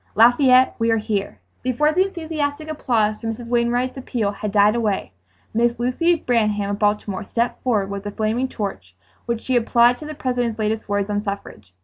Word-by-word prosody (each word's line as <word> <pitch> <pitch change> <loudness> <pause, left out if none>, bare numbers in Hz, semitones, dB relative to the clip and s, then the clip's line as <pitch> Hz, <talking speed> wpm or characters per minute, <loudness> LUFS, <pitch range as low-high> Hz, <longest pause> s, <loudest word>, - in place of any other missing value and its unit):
"Lafayette, 255 +3 +5
we 230 0 +1
are 225 - +3
here!" 210 - -2 0.2
Before 255 +5 +1
the 370 +4 +2
enthusiastic 315 -4 -3
applause 220 -8 0
for 225 - -4
Mrs. 230 +1 -5
Wainwright's 245 +2 0
appeal 235 -5 -2
had 205 0 -5
died 205 +1 +5
away, 215 - -1 0.4
Miss 235 +1 +1
Lucy 295 +9 +2
Branham 215 -8 0
of 200 - -3
Baltimore 210 -1 0
stepped 235 +4 -2
forward 210 -6 0
with 200 +1 -5
a - - -4
flaming 220 +5 -1
torch, 100 - -6 0.3
which 235 -1 -1
she 260 - 0
applied 240 +1 +4
to 305 - -8
the 305 - -6
President's 245 -4 -1
latest 215 0 -2
words 205 0 0
on 205 0 0
suffrage. 200 - -7
230 Hz, 185 wpm, -21 LUFS, 210-255 Hz, 0.4 s, Lafayette